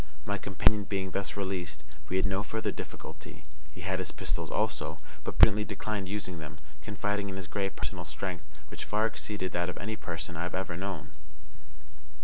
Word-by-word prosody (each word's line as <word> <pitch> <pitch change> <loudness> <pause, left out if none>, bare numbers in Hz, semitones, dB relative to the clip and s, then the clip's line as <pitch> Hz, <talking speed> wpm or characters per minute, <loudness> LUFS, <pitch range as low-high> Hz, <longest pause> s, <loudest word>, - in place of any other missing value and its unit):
My 100 +1 0
companion 100 +1 +4
being 95 -2 0
thus 100 +1 -1
released, 90 -6 -1 0.3
we 95 - +2
had 95 - +4
no 95 +1 +3
further 110 +1 0
difficulty. - - -7 0.3
He 90 - -9
had 95 +1 +1
his 95 - -1
pistols - - -1
also, - - +1 0.3
but - - -3
prudently 105 +2 +9
declined 105 -3 -2
using 95 -4 -2
them, 75 -2 -7 0.2
confiding 105 +3 0
in 95 - -3
his 95 -1 -3
great 100 0 0
personal - - -2
strength, 90 -4 -3 0.3
which - - -5
far 105 +1 +3
exceeded 105 -4 -1
that 90 0 +1
of - - -4
any 110 +4 -1
person 85 -4 -4
I 80 - -1
have 90 +1 -1
ever 95 -2 -1
known. 90 -5 -3
95 Hz, 180 wpm, -32 LUFS, 90-100 Hz, 0.3 s, prudently